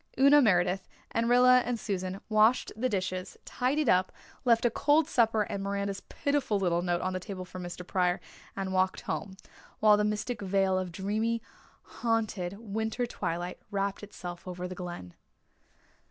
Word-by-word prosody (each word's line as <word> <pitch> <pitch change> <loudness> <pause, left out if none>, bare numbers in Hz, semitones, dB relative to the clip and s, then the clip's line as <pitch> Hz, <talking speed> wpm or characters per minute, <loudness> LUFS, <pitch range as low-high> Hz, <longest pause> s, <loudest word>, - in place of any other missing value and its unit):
Una 280 +2 +7
Meredith 185 -4 +2 0.2
and 230 +1 0
Rilla 250 +1 +7
and 245 -2 -2
Susan 190 -2 -3
washed 215 +3 +3
the 255 +4 0
dishes, 185 -3 -3
tidied 270 +3 0
up, 185 -2 +3 0.3
left 235 -1 +4
a 240 - +4
cold 295 +5 +3
supper 225 -6 +3
and 200 -1 -4
Miranda's 200 0 -2
pitiful 285 -7 -1
little 175 -2 +1
note 175 0 0
on 185 0 -1
the 185 - -2
table 185 0 -7
for 185 +1 -9
Mr. 175 0 -7
Pryor, 180 -1 +1 0.4
and 190 -1 -3
walked 185 0 +1
home, 190 -1 -4 0.4
while 210 -1 +6
the 210 - +2
mystic 210 +2 -2
veil 195 -1 +2
of 185 -1 -2
dreamy, 215 +6 -1 0.4
haunted 215 -5 -2
winter 220 +2 -2
twilight 175 -5 -4
wrapped 200 0 -2
itself 180 -4 -8
over 180 0 -4
the 185 - -6
Glen. 175 - -7
200 Hz, 160 wpm, -29 LUFS, 185-230 Hz, 0.4 s, Una